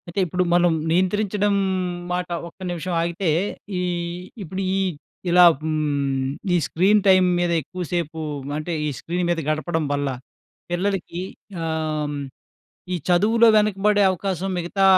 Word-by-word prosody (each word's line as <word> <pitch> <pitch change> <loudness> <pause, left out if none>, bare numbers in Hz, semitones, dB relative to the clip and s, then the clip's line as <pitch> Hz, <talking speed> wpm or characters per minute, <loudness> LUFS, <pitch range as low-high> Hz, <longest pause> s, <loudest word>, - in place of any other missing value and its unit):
అయితే 175 +3 -3
ఇప్పుడు 180 +2 0
మనం 175 0 +4 0.2
నియంత్రించడం 200 +3 +1 0.6
మాట 180 0 -1 0.2
ఒక్క 170 - -16
నిమిషం 175 +1 -3
ఆగితే, 170 +2 -2 0.5
ఈ - - 0 0.6
ఇప్పుడు 185 +3 -5
ఈ - - +1 0.5
ఇలా 180 +1 +7 0.2
హ్మ్, 140 -4 0 0.2
ఈ - - +4
స్క్రీన్ 200 +5 +3
టైమ్ 185 -1 +6
మీద 175 -1 +1
ఎక్కువ 180 +5 -6
సేపు 160 -2 -2 0.4
అంటే, 155 +3 -3
ఈ - - 0
స్క్రీన్ 175 +1 -2
మీద 170 -1 +1
గడపడం 155 +1 -1
వల్ల. 145 0 -1 0.6
పిల్లలికి 180 -1 -1 0.4
ఆహ్, 155 -2 -2 0.8
ఈ - - +1
చదువులో 220 +6 +5
వెనకబడే 210 0 +3
అవకాశం 190 0 -2
మిగతా 175 +3 -1
175 Hz, 130 wpm, -23 LUFS, 160-195 Hz, 0.8 s, ఇలా